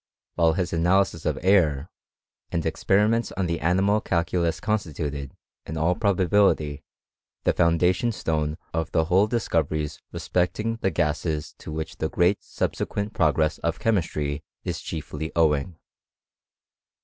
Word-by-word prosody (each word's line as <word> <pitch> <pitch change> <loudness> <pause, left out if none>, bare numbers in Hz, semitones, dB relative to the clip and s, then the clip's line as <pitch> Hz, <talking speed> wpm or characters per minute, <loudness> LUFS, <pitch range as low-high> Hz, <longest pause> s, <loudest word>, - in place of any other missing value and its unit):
While 80 -2 +3
s 90 - -1
analysis 90 0 +2
of - - 0
air, 80 -6 +3 0.6
and 85 -2 -1
experiments 110 +4 +2
on 95 - -1
the 85 -1 -1
animal 95 +6 +2
Iculus 85 -1 0
constituted, 75 -10 -3 0.3
in 80 - -4
all 80 +3 +2
probability, 95 -7 +2 0.6
the - - +3
foundation 90 +6 +2
3ne 80 -7 -1 0.2
of 80 -2 -2
the 80 - +3
whole 95 +5 +4
discoveries 80 - -1
respecting 105 +6 -1
the 95 - 0
gases 75 -2 -1
to - - -8
lich 80 +1 -5
the 80 - -1
great 90 +4 +2
subsequent 100 +1 -3
progress 80 -2 +2
of 85 -1 -1
chemistry 75 -8 -1 0.2
ia - - -1
iefly 80 0 -5
owing. 80 0 +2
85 Hz, 125 wpm, -25 LUFS, 80-95 Hz, 0.6 s, whole